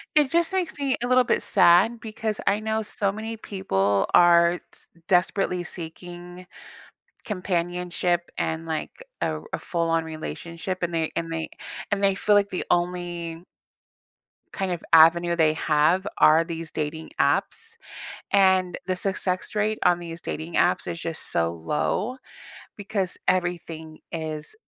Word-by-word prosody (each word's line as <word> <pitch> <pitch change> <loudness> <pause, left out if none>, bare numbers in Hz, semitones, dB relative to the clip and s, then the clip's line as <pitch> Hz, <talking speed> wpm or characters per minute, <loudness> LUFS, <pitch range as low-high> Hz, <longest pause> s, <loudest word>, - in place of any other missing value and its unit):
It 295 -3 +4
just 340 0 +2
makes 370 -3 -1
me 275 -2 +1
a - - 0
little 255 0 +5
bit - - 0
sad 195 +5 +5
because 220 -1 -4
I 200 +1 +3
know 220 0 -1
so 205 -2 -1
many 220 +2 -6
people 100 - 0
are 170 0 +6
t - - -16 0.3
desperately 180 -1 +1
seeking 175 +1 -9 0.8
companionship 175 -2 -1
and, 160 0 -2
like, 160 - -5 0.2
a - - +2
r - - -15
a - - -1
full-on 165 -1 0
relationship, 170 +3 -6
and 175 0 -1
they 160 -1 -1
and 165 0 -3
they 160 0 -3 0.4
and 200 -1 0
they 195 -1 +4
feel 210 +1 +3
like 200 0 +3
the 180 - -3
only 175 -1 -2 1.1
kind 195 -2 -2
of 175 - -4
avenue 170 +2 +6
they 160 -2 +3
have 160 +5 +2
are 155 +2 +6
these 165 -1 -6
dating 155 +1 -4
apps, 455 0 0 0.6
and 190 -2 +3
the 185 - 0
success 185 +1 -2
rate 215 +1 0
on 175 -1 +4
these 170 -1 -8
dating 160 +2 -5
apps - - +2
is 170 - -4
just 165 -1 -5
so 85 0 +1
low, 185 - -2 0.6
because 200 -2 -3
everything 165 -3 -2
is 155 -2 -5
175 Hz, 145 wpm, -25 LUFS, 165-200 Hz, 1.1 s, are